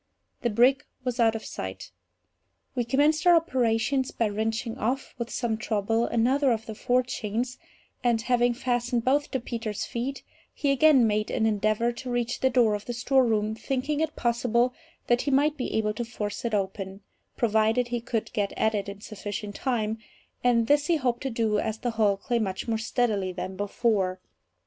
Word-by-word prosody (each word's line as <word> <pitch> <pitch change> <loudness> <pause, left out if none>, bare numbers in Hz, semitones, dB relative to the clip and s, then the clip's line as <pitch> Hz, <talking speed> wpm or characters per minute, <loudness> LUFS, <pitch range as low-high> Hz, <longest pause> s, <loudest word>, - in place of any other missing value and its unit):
The 240 - +1
brig 250 +6 +4 0.2
was 250 -1 -3
out 225 -1 +4
of 220 - -5
sight. - - -6 0.8
We 245 - 0
commenced 295 +8 +2
our 350 - +8
operations 260 -3 +1
by 225 -2 0
wrenching 225 +3 -2
off, 255 +5 -2
with 235 0 -3
some 235 -3 -1
trouble, 220 +1 0
another 260 +4 +2
of 225 -1 -1
the 220 - -6
forechains; 245 0 -1 0.4
and 240 -2 +3
having 245 -1 +2
fastened 245 -1 -1
both 285 +3 +2
to 265 - -1
Peters' 230 -3 -4
feet, 255 +4 -4 0.3
he 280 - +1
again 275 -2 +5
made 215 0 0
an 220 - 0
endeavour 215 +2 +1
to 250 +2 -7
reach 245 0 -1
the 260 - +3
door 235 -4 +3
of 205 -1 -4
the 240 - -4
storeroom, 235 -4 +2
thinking 270 +6 -2
it 315 -1 -1
possible 240 +1 +1 0.3
that 240 0 +2
he - - -2
might 290 +3 +3
be 265 - -3
able 215 -1 +1
to 240 - -3
force 220 -2 -5
it 230 -2 0
open, 195 0 -3 0.4
provided 225 +2 +2
he 240 -1 -2
could 230 -2 -3
get 205 -2 -1
at 220 - +1
it 200 -1 -2
in 200 0 -9
sufficient 205 -1 -6
time; 225 -3 -1 0.4
and 235 -2 +3
this 290 +4 +3
he 340 - +3
hoped 250 -5 0
to 270 - -2
do, 225 -3 +1
as 220 0 -2
the 240 +1 -2
hulk 215 +1 0
lay 240 - +3
much 190 -1 -3
more 225 -1 0
steadily 220 -5 0
than 185 +1 -5
before. 200 -2 0
235 Hz, 180 wpm, -27 LUFS, 215-255 Hz, 0.8 s, our